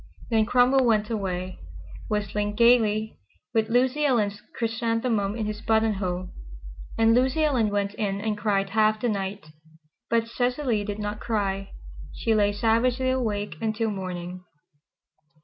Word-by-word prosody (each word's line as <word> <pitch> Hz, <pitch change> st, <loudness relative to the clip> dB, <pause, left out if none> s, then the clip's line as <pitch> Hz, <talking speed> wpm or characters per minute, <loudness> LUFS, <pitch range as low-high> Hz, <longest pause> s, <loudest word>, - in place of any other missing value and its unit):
Then 220 Hz, -1 st, +3 dB
Cromwell 255 Hz, +2 st, +4 dB
went 215 Hz, -2 st, +2 dB
away, 185 Hz, -3 st, -3 dB, 0.5 s
whistling 210 Hz, 0 st, -2 dB
gaily, 220 Hz, -2 st, +3 dB, 0.3 s
with 220 Hz, 0 st, +1 dB
Lucy 255 Hz, +5 st, +2 dB
Ellen's 215 Hz, -7 st, +1 dB
chrysanthemum 225 Hz, -2 st, -1 dB
in 225 Hz, -2 st, -2 dB
his 210 Hz, 0 st, -4 dB
buttonhole, 200 Hz, -5 st, 0 dB, 0.7 s
and 225 Hz, 0 st, +4 dB
Lucy 260 Hz, +5 st, +2 dB
Ellen 255 Hz, -8 st, +2 dB
went 205 Hz, 0 st, -1 dB
in 200 Hz, -2 st, -2 dB
and 215 Hz, 0 st, -1 dB
cried 200 Hz, -2 st, 0 dB
half 215 Hz, 0 st, +3 dB
the 240 Hz, -, 0 dB
night. 195 Hz, -5 st, -4 dB, 0.6 s
But 230 Hz, 0 st, +1 dB
Cecily 245 Hz, -2 st, 0 dB
did 205 Hz, 0 st, -4 dB
not 210 Hz, 0 st, -4 dB
cry. 195 Hz, -3 st, -2 dB, 0.4 s
She 225 Hz, -, 0 dB
lay 205 Hz, -1 st, +3 dB
savagely 235 Hz, +5 st, +1 dB
awake 215 Hz, -5 st, -2 dB
until 220 Hz, 0 st, -1 dB
morning. 180 Hz, -2 st, -6 dB
215 Hz, 130 wpm, -25 LUFS, 205-230 Hz, 0.7 s, Cromwell